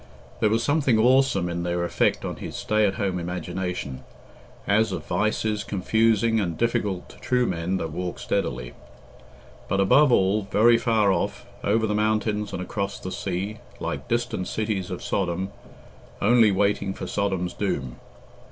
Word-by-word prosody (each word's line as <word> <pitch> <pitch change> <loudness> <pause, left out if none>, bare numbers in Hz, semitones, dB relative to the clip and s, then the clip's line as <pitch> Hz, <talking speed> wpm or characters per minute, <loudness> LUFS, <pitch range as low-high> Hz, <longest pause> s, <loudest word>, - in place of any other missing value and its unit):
There 110 - +3
was 115 +2 +1
something 145 -6 +2
awesome 125 -5 +3
in 85 0 -3
their 85 0 -1
effect - - +1
on - - -4
his - - -7
stay 110 -1 +2
at 95 - -1
home 95 -4 -1
imagination, 90 -5 -4 0.6
as 110 +1 +2
of 90 - -4
vices 105 +2 0
confusing 110 +3 +2
and 85 -6 -2
difficult 110 -6 -1
to - - -14
true 125 -1 +1
men 90 -1 -1
that 80 -3 -4
walk 90 +2 -4
steadily; 60 -11 -2 0.9
but, 100 - 0
above 130 +9 +5
all, 100 -1 +2
very 115 +2 +5
far 110 -4 +3
off, 85 - -2 0.2
over 110 +2 +2
the 105 - -1
mountains 105 0 0
and 90 - -4
across 100 0 -3
the 95 - -6
sea, 100 +4 -3 0.2
like - - -4
distant 120 -6 -1
cities 105 -4 -2
of 90 - -5
Sodom, 95 0 -1 0.7
only 115 0 +5
waiting 100 0 +1
for - - -6
Sodom's 95 -3 -1
doom. 70 -11 -3
100 Hz, 155 wpm, -25 LUFS, 90-110 Hz, 0.9 s, above